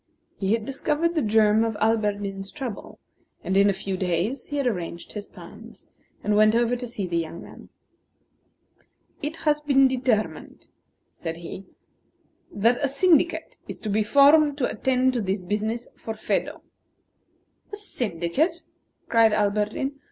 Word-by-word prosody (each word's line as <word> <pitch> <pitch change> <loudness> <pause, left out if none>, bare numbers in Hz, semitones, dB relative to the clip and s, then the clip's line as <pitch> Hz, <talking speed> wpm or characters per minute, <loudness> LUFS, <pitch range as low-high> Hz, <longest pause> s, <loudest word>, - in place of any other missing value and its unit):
He 195 +1 +1
had 225 -1 -1
discovered 300 +5 -1
the 320 - +1
germ 215 -1 +3
of 225 -1 -1
Alberdin's 205 -3 -1
trouble; 255 -8 -7 0.5
and 190 - -1
in 200 +1 +5
a - - +4
few 190 0 -4
days 185 +8 -1
he 290 - -4
had 280 - 0
arranged 175 -7 -3
his 210 -1 -6
plans, - - -13 0.4
and 210 - +1
went 215 +1 +5
over 240 +1 +2
to 245 0 -5
see 215 -4 -4
the 170 -2 -1
young 165 +1 -5
man. - - -13 1.5
"It 295 +2 -3
has 300 0 +2
been 275 -2 +4
determined," 250 -4 -2 0.5
said 165 -1 -6
he, 175 +3 -9 0.8
"that 230 +7 +2
a - - +3
syndicate 335 +4 +2
is - - -6
to 215 - -4
be 215 +2 +2
formed 285 +5 +5
to 260 - +1
attend 255 +3 +1
to 240 - -1
this 190 -1 -2
business 215 +5 -2
for 225 - -6
Phedo." 215 - -2 1.1
"A - - -4
syndicate!" 270 - -2 0.4
cried 225 -2 +4
Alberdin. 210 +7 -1
225 Hz, 150 wpm, -25 LUFS, 200-270 Hz, 1.5 s, in